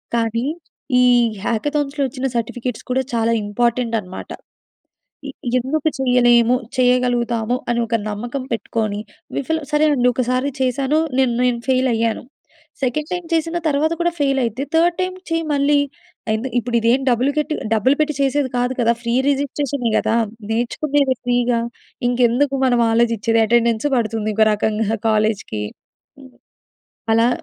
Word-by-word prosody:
కానీ, 230 +1 0 0.6
ఈ - - +5 0.4
హ్యాకథాన్స్‌లో 290 +4 -1
వచ్చిన 260 +1 -5
సర్టిఫికెట్స్ 235 +1 -3
కూడా 265 +1 +1
చాలా 230 0 +1
ఇంపార్టెంట్ 235 +2 0
అనమాట. 185 -1 -9 1.0
ఇ - - -4 0.3
ఎందుకు 290 +5 0
చేయలేము 245 -2 +4 0.2
చేయగలుగుతాము, 245 -2 +1
అని 235 - +1
ఒక 230 0 +1
నమ్మకం 240 +6 -4
పెట్టుకొని 215 -2 -2 0.4
విఫలం 320 +3 -1
సరేనండి 295 -5 +3
ఒకసారి 255 +2 0
చేశాను 270 +4 +1 0.2
నేను 255 -3 +3
నేను 240 -1 +1
ఫెయిలయ్యాను. 235 -3 +1 0.6
సెకండ్ 295 +4 -1
టైమ్ 355 -1 -3
చేసిన 330 +1 0
తర్వాత 305 +2 +1
కూడా, 345 0 +2
ఫెయిలైతే 270 -3 0
థర్డ్ 340 +1 +3
టైమ్. 370 0 -1
చేయి 330 0 -1
మళ్ళీ. 285 0 +3 0.6
ఎందు 235 +4 -2
ఇప్పుడు 240 0 -1
ఇదేం 235 +4 +3
డబ్బులు 250 +3 +2
కట్టి 305 0 0 0.2
డబ్బులు 225 +6 +3
పెట్టి 305 0 +1
చేసేది 275 0 +1
కాదు 245 +1 +1
కదా! 235 0 +4
ఫ్రీ 235 0 -1
రిజిస్ట్రేషనే 280 -3 -1
కదా! - - 0 0.4
నేర్చుకునేది 265 +4 +1
ఫ్రీగా 245 -1 +1 0.5
ఇంకెందుకు 250 +3 +2
మనం 245 -2 +3
ఆలోచించేది, 230 -1 +2
అటెండెన్సూ 235 +3 +2
పడుతుంది 220 -2 -1
ఇంకో 220 +1 +4
రకంగా 220 +1 0
కాలేజ్‌కి. 210 - 0 0.6
హ్మ్. 260 -1 -14 0.8
అలా 230 +1 +4
245 Hz, 130 wpm, -20 LUFS, 230-280 Hz, 1.0 s, ఈ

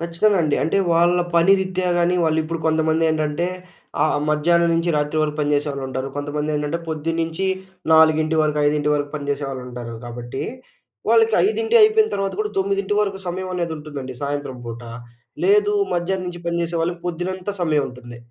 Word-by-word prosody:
ఖచ్చితంగా 170 +5 +1
అండి. 150 -2 +1
అంటే 160 - 0 0.2
వాళ్ళ 175 +1 +4 0.2
పని 170 +3 +6
రిత్యా 185 -1 -2
గాని, 175 +1 +2
వాళ్ళు 160 0 +2
ఇప్పుడు 165 +1 -4
కొంతమందేంటంటే 160 0 +1 0.6
ఆహ్, 155 -1 +2
మధ్యాహ్నం 170 +3 +3
నుంచి 165 +1 +1
రాత్రి 150 +1 0
వరకు 150 -1 -2
పని 145 0 0
చేసేవాళ్ళుంటారు. 135 -2 -2
కొంతమందేంటంటే 150 +2 -2
పొద్దున్నుంచి 165 +3 -2 0.5
4 160 0 +4
వరకు 150 -1 0
5 150 0 +1
వరకు 145 0 -2
పని 145 -1 -5
చేసేవాళ్ళుంటారు. 125 -4 -5
కాబట్టి 120 +2 -6 0.7
వాళ్ళకి 450 0 +4
5 450 +2 0
అయిపోయిన 435 0 +5
తర్వాత 195 -1 -1
కూడా 210 0 -1
9 195 +1 0
వరకు 200 -2 -1
సమయం 185 +1 -3
అనేది 170 -2 -2
ఉంటుందండి 145 -4 -7
సాయంత్రం 140 -2 -3
పూట. 115 +1 -7 0.6
లేదు 415 +2 +4 0.2
మధ్యాహ్నం 185 +2 -1
నుంచి 175 -1 -6
పని 170 0 0
జేసే 170 0 -2
వాళ్ళకి 170 +1 -2
పొద్దునంతా 180 +3 -3
సమయం 155 -4 +2
ఉంటుంది. 125 -1 -11
160 Hz, 155 wpm, -21 LUFS, 145-180 Hz, 0.7 s, పని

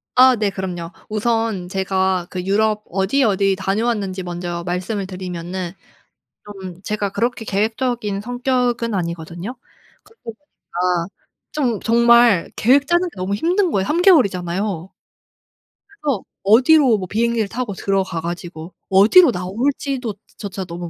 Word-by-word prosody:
아 255 0 +7
네 210 -2 0
그럼요. 180 -3 -5 0.2
우선 220 -4 -1
제가 190 -1 0
그 180 -1 -4
유럽 210 +2 +1
어디 195 +9 +1
어디 195 -2 +2
다녀왔는지 195 -1 -1
먼저 175 -1 -5
말씀을 185 +3 -2
드리면은 180 -1 -5 0.7
좀 190 -3 -9
제가 210 -1 -2
그렇게 235 +1 -2
계획적인 215 0 -1
성격은 245 -1 -1
아니거든요. 170 +5 -4 0.5
그러다 445 +2 -25
보니까 180 - -3 0.4
좀 250 -8 -1
정말 235 -4 +4
계획 275 +5 +3
짜는 350 +1 +2
게 - - -23
너무 185 +2 -2
힘든 355 - +1
거예요. 190 -1 0
3 320 - +1
개월이잖아요. 195 - +2 1.0
그래서 300 - -3 0.2
어디로 250 +4 +5
뭐 185 -2 -5
비행기를 230 +1 0
타고 235 0 -4
들어가 190 -2 -1
가지고 170 0 -6 0.2
어디로 225 - +7
나올지도조차 215 -1 -4
너무 175 0 -7
200 Hz, 300 characters per minute, -20 LUFS, 185-240 Hz, 1.0 s, 아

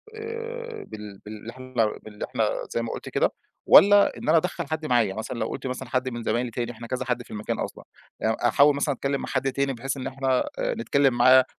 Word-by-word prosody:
آآ، 460 +1 -6
بال 105 -2 -9
باللي 110 +2 -8
إحنا 130 +1 -12 0.3
باللي 105 -1 -6
إحنا - - 0 0.2
زي 115 - 0
ما 115 - -3
قُلت - - -6
كده - - +2 0.3
والّا 205 0 +7
إن - - -4
أنا 165 - +6
أدخّل 170 -2 -1
حَد 155 0 -3
معايا، 115 -7 +2
مثلًا 115 +2 -5
لو - - 0
قُلت - - -5
مثلًا 130 0 -5
حَد 130 +1 0
من 120 -1 -6
زمايلي 120 +2 0
تاني 120 +1 -3
إحنا 115 0 -9
كذا 130 +1 -3
حَد 125 -1 -1
في - - -17
المكان 105 0 -3
أصلًا - - -5 0.4
يع 110 0 +2
أحاول 140 +4 +5
مثلًا 140 -1 0
أتكلّم 140 +2 -1
مع - - -5
حَد 135 -1 0
تاني 140 0 0
بحيث 135 +3 -4
إن 130 - -4
إحنا 130 -1 0
آآ - - 0
نتكلّم 135 +2 +2
معاه 130 +2 +6
130 Hz, 225 wpm, -25 LUFS, 115-140 Hz, 0.4 s, والّا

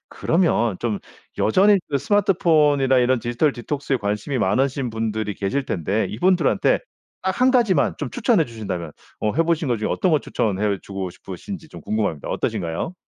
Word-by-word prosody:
그러면 160 - +1
좀 110 -4 -2 0.4
여전히 200 - +4
그 140 -2 0
스마트폰이나 155 - +3
이런 125 +1 +3
디지털 120 +6 0
디톡스에 135 +2 -2
관심이 105 +5 -2
많으신 130 +5 0
분들이 110 -2 -2
계실 130 +8 -2
텐데 95 +5 -1
이분들한테 185 - +2 0.4
딱 190 +4 -2
1 255 +1 +5
가지만 225 - +3
좀 - - -4
추천해 235 -8 +2
주신다면 95 - -5 0.3
어 105 - 0
해 165 - +3
보신 165 -1 0
것 120 -3 +1
중에 105 - -2
어떤 180 -4 +1
것 150 - +2
추천해 100 -1 -1
주고 95 -2 -5
싶으신지 160 - -8
좀 - - -11
궁금합니다. 105 -9 -2
어떠신가요? 85 - -2
130 Hz, 380 characters per minute, -22 LUFS, 105-165 Hz, 0.4 s, 1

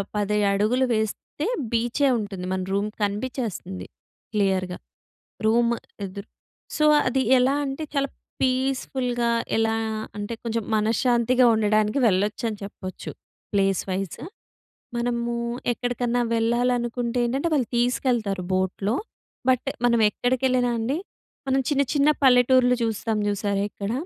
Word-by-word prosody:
10 210 0 0
అడుగులు 215 +6 +2
వేస్తే 220 +7 -3 0.3
బీచే 240 +5 +1
ఉంటుంది. 200 -4 -5
మన 190 - -1
రూమ్ 200 +2 0
కనిపిచ్చేస్తంది 205 - -3 0.5
క్లియర్‌గా 190 -3 0 0.7
రూమ్ 235 +2 +3 0.3
ఎదురు. 200 +2 -8 0.5
సో 305 - +3 0.2
అది 260 +1 +1 0.2
ఎలా 255 +2 +3
అంటే 275 +3 -4
చాలా 280 -1 0 0.3
పీస్‌ఫుల్‌గా, 255 -2 0 0.3
ఎలా 225 0 +2 0.4
అంటే 205 +2 -4
కొంచెం 230 -1 -2
మనశ్శాంతిగా 240 +3 +3
ఉండడానికి 215 +2 +2
వెళ్లోచ్చని 210 +3 0
చెప్పొచ్చు. 190 -2 -7 0.4
Place 195 -1 +2
wise. 190 -2 -3 0.8
మనమూ 235 0 -1 0.4
ఎక్కడికన్నా 245 0 -1
వెళ్ళాలనుకుంటే 240 +1 0
ఏంటంటే, 270 +7 0
వాళ్ళు 255 -6 0
తీసుకెళ్తారు 235 -6 0
బోట్‌లో. 190 +4 0 0.5
బట్ 255 +1 +2 0.2
మనం 235 -1 +3
ఎక్కడికెళ్ళినా 250 +1 +1
అండి 250 +7 -1 0.5
మనం 265 +1 +3
చిన్న 280 -1 +3
చిన్న 285 +1 +4
పల్లెటూర్లు 250 -1 +5
చూస్తాం 220 -1 -1
చూశారా 200 -1 -1
ఇక్కడ... 200 +1 -4
235 Hz, 110 wpm, -24 LUFS, 205-250 Hz, 0.8 s, పల్లెటూర్లు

